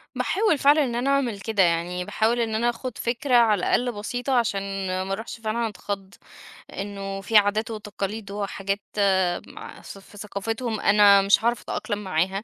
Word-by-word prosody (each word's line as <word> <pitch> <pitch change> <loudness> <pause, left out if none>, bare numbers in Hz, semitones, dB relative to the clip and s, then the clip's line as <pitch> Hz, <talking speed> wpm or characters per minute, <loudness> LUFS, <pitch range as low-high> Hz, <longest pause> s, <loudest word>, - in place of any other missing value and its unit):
باحاول 405 -6 +1
فعلًا 290 +2 +5
إن 240 -3 -2
أنا 245 +3 0
أعمل 260 -7 +1
كده، 205 -2 +1
يعني 175 +1 0
باحاول 225 +5 0
إن 225 -2 -1
أنا 235 +2 +2
آخد 240 0 -5
فكرة 250 +2 0
على 225 -4 +5
الأقل 245 +7 +1
بسيطة 245 +5 -3
عشان 230 -4 +1 0.4
ما 190 - -6
أروحش 220 +3 -6
فعلًا 225 +1 -1
أتخض، 200 -1 -6 0.6
إنّه 195 -1 -5
في 215 +3 +3
عادات 210 +2 +2
وتقاليد 210 -1 -5
وحاجات 200 0 -3 0.7
مع - - -11
في - - -10
ثف 195 +1 -14
ثقافتهم 220 +3 -4
أنا 200 -1 +6
مش 200 +2 +3
هاعرف 235 -1 +1
أتأقلم 205 0 -4
معاها. 190 +2 -1
210 Hz, 165 wpm, -24 LUFS, 200-235 Hz, 0.7 s, أنا